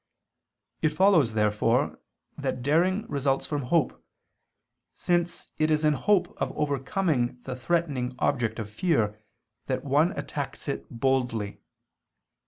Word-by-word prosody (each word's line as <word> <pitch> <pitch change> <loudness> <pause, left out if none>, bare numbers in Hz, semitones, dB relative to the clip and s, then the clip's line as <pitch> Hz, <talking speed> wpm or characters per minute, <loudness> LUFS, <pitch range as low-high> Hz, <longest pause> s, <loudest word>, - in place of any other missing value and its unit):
It 155 - +3
follows, 155 - +4
therefore, 105 -1 +1 0.4
that 125 - -3
daring 180 - +2
results 140 -1 0
from 145 -2 -2
hope; 165 +4 +1 0.9
since 175 -1 -1
it 155 0 +3
is 155 0 +2
in 150 - +4
the 140 - -4
hope 190 -4 +2
of - - 0
overcoming 140 -2 0
the 125 - -5
threatening 130 -3 -1
object 125 -5 0
of 110 -3 -4
fear, 105 - +1 0.5
that - - -2
one - - +3
attacks - - -5
it - - -4
boldly. 120 -4 -1
140 Hz, 125 wpm, -27 LUFS, 125-170 Hz, 0.9 s, follows